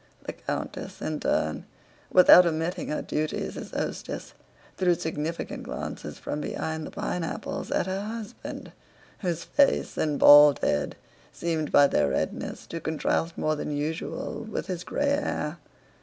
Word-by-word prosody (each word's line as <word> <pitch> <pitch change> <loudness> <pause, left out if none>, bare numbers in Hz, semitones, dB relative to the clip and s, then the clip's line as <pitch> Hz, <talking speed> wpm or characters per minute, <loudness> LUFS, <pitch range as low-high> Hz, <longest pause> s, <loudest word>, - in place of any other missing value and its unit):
The - - -5
countess - - -5
in - - -3
turn, 80 0 0 0.5
without 180 -1 +8
omitting 170 +2 -2
her 150 - -2
duties 155 0 -2
as - - -7
hostess, - - -4 0.4
threw 180 -2 +3
significant 160 -1 -4
glances - - -6
from 150 - -4
behind 160 0 -3
the - - -7
pineapples 170 -2 -4
at - - +1
her 190 +1 -2
husband 215 0 -7 0.5
whose 175 -4 -2
face 280 -1 +2
and 150 -2 +1
bald 145 0 +9
head 75 0 0 0.4
seemed 160 -3 -2
by 145 - +7
their 75 - +2
redness - - -3
to 165 - -6
contrast 160 +1 -1
more 155 0 +1
than 145 0 -3
usual 155 +8 -3
with 220 -2 -4
his 180 -2 -4
gray 285 - -1
hair. 280 - -1
165 Hz, 140 wpm, -27 LUFS, 150-180 Hz, 0.5 s, bald